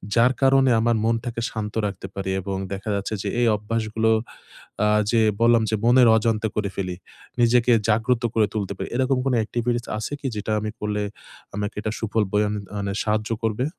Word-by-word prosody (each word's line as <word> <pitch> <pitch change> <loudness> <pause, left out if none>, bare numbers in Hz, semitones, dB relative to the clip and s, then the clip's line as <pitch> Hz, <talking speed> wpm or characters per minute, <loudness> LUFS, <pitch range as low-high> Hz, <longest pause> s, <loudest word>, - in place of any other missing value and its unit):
যার 120 +2 +5
কারণে, 135 -1 +5
আমার 120 +1 +2
মনটাকে 115 +1 -1
শান্ত 105 -2 -4
রাখতে 95 -1 -7
পারি? 95 -1 -3
এবং 95 +1 -4 0.2
দেখা 100 +2 -5
যাচ্ছে, 100 +2 -3
যে, - - -3
এই 120 - +4
অভ্যাসগুলো 110 +1 -1 0.7
আ - - +4 0.2
যে 115 -1 +3 0.2
বললাম 115 0 +5
যে, 110 - +1
মনের 125 +1 +6
অজান্তে 110 -1 0
করে 105 -2 -1
ফেলি। 90 -2 -3 0.5
নিজেকে 120 +1 +4 0.2
জাগ্রত 115 +3 +2
করে 110 -1 +4
তুলতে 100 -3 -2
পারি। - - -4
এরকম 130 +1 +2
কোনো 135 -2 +2
এক্টিভিটিস 120 +1 -2
আছে 110 +6 -4
কি, 140 - -3
যেটা 105 +1 -3
আমি 105 0 -3
করলে 105 0 -2 0.5
আমাকে 105 0 -3
এটা 110 - -2
সুফল 110 -1 0
বয়ে 105 0 +3 0.3
মানে, 100 -1 -2
সাহায্য 105 0 -1
করবে? 115 +3 0
110 Hz, 180 wpm, -23 LUFS, 105-120 Hz, 0.7 s, মনের